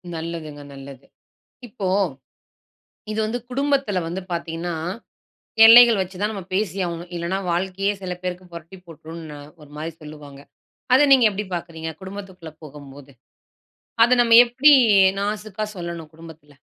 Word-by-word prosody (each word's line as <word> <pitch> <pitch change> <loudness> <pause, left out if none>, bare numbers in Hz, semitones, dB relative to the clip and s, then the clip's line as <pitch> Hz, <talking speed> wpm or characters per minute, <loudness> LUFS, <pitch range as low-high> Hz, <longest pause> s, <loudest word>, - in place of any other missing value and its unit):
நல்லதுங்க. 160 -3 -7
நல்லது. 135 0 -12 0.6
இப்போ, 200 -4 -5 1.2
இது 215 - -3
வந்து 230 +3 -3
குடும்பத்துல 275 -7 0
வந்து 180 +3 -5
பார்த்தீங்கன்னா, 170 0 -4 0.9
எல்லைகள் 230 -2 +8
வைச்சுதான் 190 +3 -4
நம்ம 195 -3 -7
பேசியாகணும். 180 -4 -3
இல்லைனா 170 +3 -3
வாழ்க்கையே 190 +3 -1
சில 180 -1 -4
பேருக்கு 180 0 -6
புரட்டி 170 +3 -11
போட்டுரும்னு 160 -1 -11 0.2
ஒரு 145 - -16
மாரி 160 +2 -5
சொல்லுவாங்க. 150 -2 -12 0.5
அதை 265 - +6
நீங்க 260 -3 +6
எப்படி 205 +1 -5
பார்க்கிறீங்க? 165 -1 -7
குடும்பத்துகுள்ள 190 -4 -10
போகும்போது. 140 -1 -13 0.9
அதை 250 - +3
நம்ம 230 -1 +3
எப்படி 260 +5 +4 0.5
நாசுக்காக 210 0 -4
சொல்லணும், 170 -3 -7
குடும்பத்துல? 160 -3 -15
175 Hz, 120 wpm, -21 LUFS, 160-205 Hz, 1.2 s, எல்லைகள்